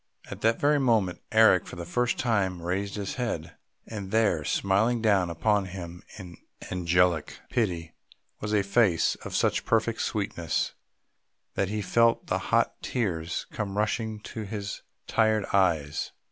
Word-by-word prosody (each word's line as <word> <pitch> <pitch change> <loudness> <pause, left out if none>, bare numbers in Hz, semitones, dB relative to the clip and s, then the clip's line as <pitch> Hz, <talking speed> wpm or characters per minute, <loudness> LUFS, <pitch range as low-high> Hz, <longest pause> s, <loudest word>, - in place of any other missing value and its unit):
At - - -7
that 115 +1 +2
very 145 +1 +3
moment 110 -9 +1
Eric, 110 -4 +5
for - - -8
the 85 -1 -6
first 125 +8 0
time, 95 -7 0
raised 95 +3 -2
his 100 +2 -4
head 85 -10 -3 0.3
and 100 -4 -6
there, 105 -8 +2
smiling 100 +9 +1
down 100 -5 +3
upon 100 +5 +1
him 90 -2 -8 0.2
in 90 -4 -10 0.3
angelic 90 -2 +1
pity, 85 -8 -1 0.5
was 105 - -4
a 105 -2 +3
face 100 -4 +3
of - - -5
such - - +1
perfect 115 0 +1
sweetness, 100 -6 -1 0.8
that 100 - 0
he 105 0 -2
felt 115 +3 +3
the - - 0
hot - - +2
tears 85 -9 -2
come 100 -1 -4
rushing 110 +1 -1
to 110 - -7
his 100 -1 -5 0.2
tired 110 -2 +2
eyes. 80 -7 +1
100 Hz, 145 wpm, -27 LUFS, 90-110 Hz, 0.8 s, Eric